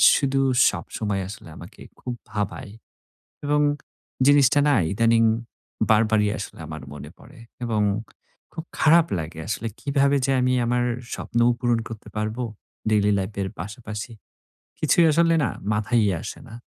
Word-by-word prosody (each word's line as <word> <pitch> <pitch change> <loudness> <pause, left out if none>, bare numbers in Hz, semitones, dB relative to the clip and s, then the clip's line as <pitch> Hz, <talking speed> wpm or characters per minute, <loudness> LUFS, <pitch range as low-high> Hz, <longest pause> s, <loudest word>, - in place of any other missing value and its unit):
শুধু 135 -1 +1 0.3
সবসময় 105 -3 -3
আসলে 100 -4 -10
আমাকে 85 +6 -12 0.2
খুব 125 - -5 0.2
ভাবায় 105 +2 -4 0.7
এবং 150 +1 +2 0.7
জিনিসটা 145 0 +5
না 145 - +4 0.2
ইদানিং 115 +2 +3 0.7
বারবারই 110 -1 +4
আসলে - - -7
আমার 80 -1 -7
মনে 75 0 -9
পড়ে - - -16 0.3
এবং 110 -3 0 0.7
খুব 160 - -5 0.2
খারাপ 165 +1 +6
লাগে 80 0 -6
আসলে। 110 +2 -2
কীভাবে 140 0 +2
যে 135 - +1
আমি 130 0 +2
আমার 120 +1 +1 0.3
স্বপ্নও 120 0 +1
পূরণ 120 -1 +1
করতে 115 -2 -9
পারবো 110 +3 -2 0.5
ডেইলি 105 -1 +3
লাইফের 100 0 -3
পাশাপাশি? 105 +4 -6 0.7
কিছুই 170 - +4
আসলে 165 +2 +3
না - - +1 0.2
মাথায়ই 105 0 +2
আসে - - -7
না। - - -12
115 Hz, 135 wpm, -24 LUFS, 105-135 Hz, 0.7 s, খারাপ